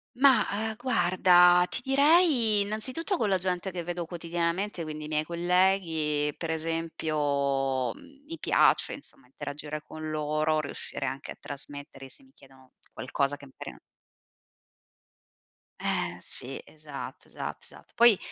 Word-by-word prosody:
Ma, 260 -4 +5
uhm, 220 +2 -2
guarda, 180 -6 +5
ti - - -1
direi, 270 - +4
innanzitutto, 255 - -1
con 215 - 0
la 190 - +3
gente 180 +1 -1
che 180 -2 -5
vedo 175 0 -4
quotidianamente, 170 +3 -2
quindi 155 -1 -6
i - - -6
miei 155 0 0
colleghi, 170 -4 +1
per 165 - -5
esempio, 145 -5 -1
mhmm, 280 0 -17
mi 330 +2 -7
piace, - - +3
insomma, 280 - -12
interagire 150 - -6
con 155 0 -7
loro, 155 0 0
riuscire 145 -1 -5
anche 135 +1 -5
a - - -9
trasmettere, 140 -1 -7
se 275 - -8
mi 265 - -23
chiedono 130 -1 -19 0.2
qualcosa 140 +2 -1
che 140 - -13
magari 135 - -9
non - - -16 2.0
Eh - - -1
sì, 135 +2 -1
esatto, 150 -3 -9
esatto, - - -6
esatto. - - -17
Poi 235 -3 +7
170 Hz, 140 wpm, -28 LUFS, 150-210 Hz, 2.0 s, Poi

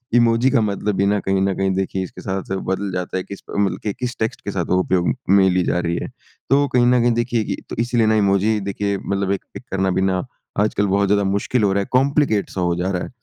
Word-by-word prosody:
Emoji 120 +2 +4
का 125 -5 +3
मतलब 105 0 -1
भी 100 - +2
ना 100 +1 +2
कहीं 95 0 0
न 95 0 +1
कहीं 95 0 +1
देखिए 95 0 -1
इसके 95 - -9
साथ-साथ 95 0 -3
बदल 95 +1 -2
जाता 90 0 -3
है, 95 - -2
किस 100 - -9
प्र - - -8
मतलब 100 -1 +1
कि 105 - -1
किस 125 -1 -3
टेक्स्ट 110 0 -2
के 100 - -2
साथ 90 -3 -2
वो 90 - +3
उपयोग 90 -1 +1 0.2
में 95 -1 +5
ली 90 0 +2
जा 90 - 0
रही 85 -1 -1
है। - - -4 0.4
तो 140 +1 +4
कहीं 125 -2 +2
न 125 0 +4
कहीं 120 0 +3
देखिए 120 -1 0
कि - - -3
तो - - -5
इसीलिए 120 -1 +2
ना 110 - +3
इमोजी 105 +1 +2
देखिए 100 0 -2
मतलब 100 0 -2
एक 100 - -2
पिक - - -9
करना 95 0 +1
भी 95 - 0
ना 95 -1 +1 0.4
आजकल 105 -1 +1
बहुत 100 +1 +2
ज़्यादा 100 0 +2
मुश्किल 100 +4 0
हो 100 - +3
रहा 100 - +1
है, 100 - -5
कॉम्प्लिकेट 135 -4 +2
सा 95 - -4
हो 85 -1 +1
जा 90 +2 -1
रहा 90 -2 -2
है। - - -6
100 Hz, 270 wpm, -20 LUFS, 95-110 Hz, 0.4 s, में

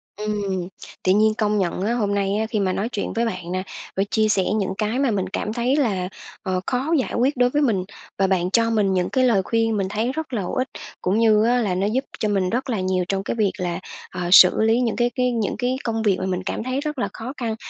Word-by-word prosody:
Ừm, 200 -4 -2 0.4
tự 185 - +3
nhiên 215 +2 +4
công 210 -1 +1
nhận 180 -1 -1
á, 215 +4 0
hôm 210 -4 0
nay 200 0 0
á 220 - 0
khi 215 - -1
mà 185 -2 +1
nói 215 +4 -2
chuyện 205 - -3
với 230 +1 0
bạn 180 -5 -4
nè 185 0 -2 0.3
và 195 - +2
chia 220 -1 +3
sẻ 195 -2 +2
những 195 -3 -1
cái 220 +4 -1
mà 270 -4 +2
mình 190 -2 -1
cảm 210 +2 -3
thấy 245 +3 +1
là, 195 -11 0 0.3
ờ, 185 -2 -1
khó 265 +6 0
giải - - -2
quyết 260 +3 +1
đối 245 0 +4
với 295 +3 +1
mình 215 -9 +2 0.3
và 195 - +2
bạn 185 -1 0
cho 230 +2 +3
mình 210 -4 +2
những 180 -1 0
cái 260 -1 +1
lời 230 -6 +4
khuyên 225 +1 +1
mình 195 -2 0
thấy 220 +5 -1
rất 315 -1 -5
là 220 - 0
hữu 180 - -4
ích, 255 +1 0 0.3
cũng 195 +4 +1
như 215 -2 +4
á 245 +2 +3
là 195 -5 0
nó 195 +3 0
giúp 255 +5 0 0.2
cho 215 - 0
mình 195 -3 +1
rất 255 +4 -2
là 225 -5 0
nhiều 185 -1 0
trong 195 0 -1
cái - - -3
việc 210 -4 +2
là, 175 -2 -2 0.3
ờ, 180 - -5
xử 185 +2 +8
lý 225 +2 +3
những 230 -3 0
cái 240 0 +2
cái 250 0 +1
những 225 -4 -1
cái 250 +2 0
công 225 -1 -1
việc 200 -4 +3
mà 185 - -2
mình 185 -1 -2
cảm - - -3
thấy 255 +3 -2
rất 300 -1 -4
là - - -1
khó 240 +4 -6
khăn 230 -3 -2
215 Hz, 270 wpm, -22 LUFS, 190-240 Hz, 0.4 s, xử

